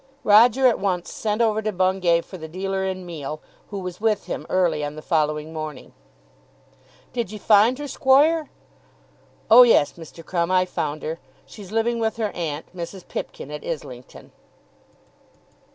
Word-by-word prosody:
Roger 235 +5 +5
at 245 - +4
once 185 -3 -2
sent 215 +1 -1
over 220 -1 +1
to 215 0 -2
Bungay 185 -2 +2
for 185 - -12
the 160 - -7
dealer 190 +3 -3
in 185 -1 -4
meal, 155 -3 -6 0.3
who 205 - -6
was 180 0 -6
with 220 -2 +1
him - - -5
early 170 -5 +1
on 145 0 -4
the 155 - -8
following 155 0 -1
morning. 155 -3 -7 1.2
"Did 235 -6 -3
ye 215 - -6
find 215 +4 +4
her, 290 0 -6
squoire?" 290 +4 +3 1.0
"Oh, 240 +3 +10
yes, 230 -12 +5
Mr. 165 0 -12
Crumb, 170 0 -1
I 185 0 +3
found 155 -4 -4
her. 160 +2 -4 0.3
She's 200 -3 -12
living 230 +1 0
with 220 -1 -1
her 215 -3 -1
aunt, 160 0 -5
Mrs. 180 +1 -7
Pipkin, 145 - -6
at 150 - -7
Islington." 130 -6 -8
185 Hz, 160 wpm, -23 LUFS, 160-220 Hz, 1.2 s, Oh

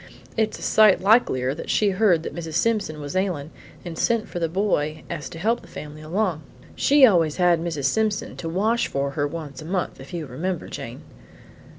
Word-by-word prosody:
It's 220 -1 0
a - - -10
sight 215 -3 +5
likelier 185 - +3
that 155 - -8
she 205 -2 +3
heard 185 -4 +3
that - - -5
Mrs. 165 -2 -6
Simpson 210 -8 0
was 145 +3 -6
ailin' 175 -6 -1 0.3
and 170 -2 -6
sent 230 +5 +1
for 175 - -5
the 165 -1 0
boy 160 -5 0
so - - -4
as 150 - -7
to - - -9
help 225 +7 0
the - - -15
family 150 0 -9
along. 170 0 -1 0.3
She 285 -1 +6
always 170 -9 +3
had 175 -2 +3
Mrs. 160 -5 -3
Simpson 215 +6 0
to 165 - -4
wash 215 +7 +1
for 140 0 -2
her 145 +1 -1
once 155 -1 -7
a - - -9
month, 180 +1 -2
if 135 +1 -11
you 170 -3 -4
remember 165 +7 -4
Jane?" - - -7
170 Hz, 205 wpm, -24 LUFS, 155-205 Hz, 0.3 s, She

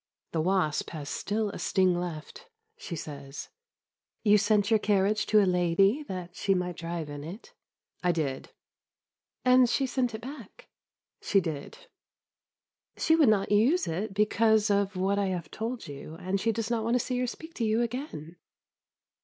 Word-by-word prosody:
The 160 - 0
wasp 175 -3 +1
has 150 -3 -6
still 210 0 -2
a - - -8
sting 185 -2 +2
left; 170 - -7 0.3
she 180 - -7
says, 140 -2 -7 0.7
"You 210 -1 +5
sent 205 +1 +2
your 220 - +5
carriage 205 +1 +1
to 210 -1 +5
a - - +3
lady, 185 - +3
that 180 -2 -6
she 195 -1 +1
might 180 -2 -2
drive 165 -2 -4
in 145 -1 -7
it?" 200 - -9 0.5
"I 180 - +3
did." 145 -5 -3 1.0
"And 250 -1 +6
she 270 - +1
sent 250 -3 -1
it 220 - -7
back." 255 -4 -10 0.5
"She 200 - +3
did." 170 - -6 1.1
"She 320 - +3
would 305 -7 +5
not 200 -2 +2
use 255 - +4
it 195 +5 -3
because 215 0 +3
of 200 0 +1
what 195 +2 +1
I 200 - +1
have 175 -4 -4
told 230 +2 -4
you, 145 +2 -8
and 185 +3 -2
she 225 - +2
does 225 +1 -3
not 230 -2 0
want 230 +2 +1
to - - +3
see 250 +1 -2
or 250 - 0
speak 320 +7 -8
to 240 - -3
you 220 +2 +2
again!" 230 - -6
200 Hz, 170 wpm, -28 LUFS, 175-225 Hz, 1.1 s, And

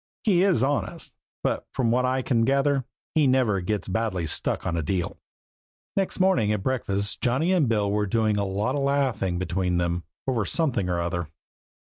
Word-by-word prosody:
He 185 -5 +3
is 185 - +3
honest, 135 -4 -2 0.3
but - - -1
from 120 -3 +1
what 125 +1 +2
I 130 0 0
can 115 -3 +2
gather 135 +1 +2 0.3
he 150 -3 +4
never 125 -7 +2
gets 105 +3 -2
badly 95 -3 -1
stuck 80 +1 -1
on 85 - -1
a 85 - 0
deal. 85 +3 -2 0.8
Next 195 -1 0
morning 185 - +3
at 105 -3 -1
breakfast 100 -5 -1
Johnny 135 +9 +2
and 155 -10 +3
Bill 105 -3 +1
were 105 0 0
doing 110 +1 +1
a 100 - +1
lot 100 +6 -1
of 145 - -1
laughing 130 -10 0
between 90 0 -1
them 85 0 -1 0.2
over 120 -5 +1
something 120 - 0
or 90 -1 0
other. 85 -1 -2
110 Hz, 185 wpm, -25 LUFS, 95-135 Hz, 0.8 s, he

